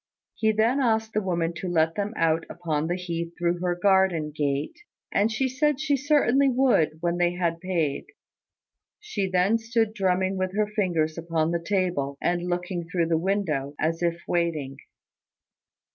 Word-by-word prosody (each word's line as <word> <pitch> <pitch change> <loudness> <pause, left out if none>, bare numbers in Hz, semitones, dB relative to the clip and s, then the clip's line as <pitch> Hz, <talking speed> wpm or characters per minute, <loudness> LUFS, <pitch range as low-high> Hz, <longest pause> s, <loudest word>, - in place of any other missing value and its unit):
He 220 -1 +1
then 225 +5 +2
asked 220 -3 +1
the 215 - +1
woman 170 -3 -1
to 185 - -5
let 165 -2 +2
them 205 +3 -3
out 165 0 +2
upon 160 -3 -2
the 175 - 0
heath 170 -2 -4
through 175 0 0
her 175 0 0
garden 185 -4 +2
gate; 145 - -2 0.3
and 210 +3 +2
she 260 +4 0
said 280 +2 +1
she 300 -2 +1
certainly 280 -1 +3
would 245 - +2
when 170 0 0
they 175 0 +2
had 170 -2 -1
paid. 170 -6 -1 0.9
She 210 - -3
then 185 +5 +2
stood 225 -1 0
drumming 190 -1 0
with 185 +1 -2
her 215 - +3
fingers 175 -7 -1
upon 165 -1 0
the 170 0 -1
table, 175 -8 -1
and 175 0 -1
looking 175 -1 -3
through 170 -1 0
the 165 - +3
window, 165 -7 -1
as 165 +2 0
if 170 -1 0
waiting. 155 -6 -1
180 Hz, 165 wpm, -25 LUFS, 165-215 Hz, 0.9 s, certainly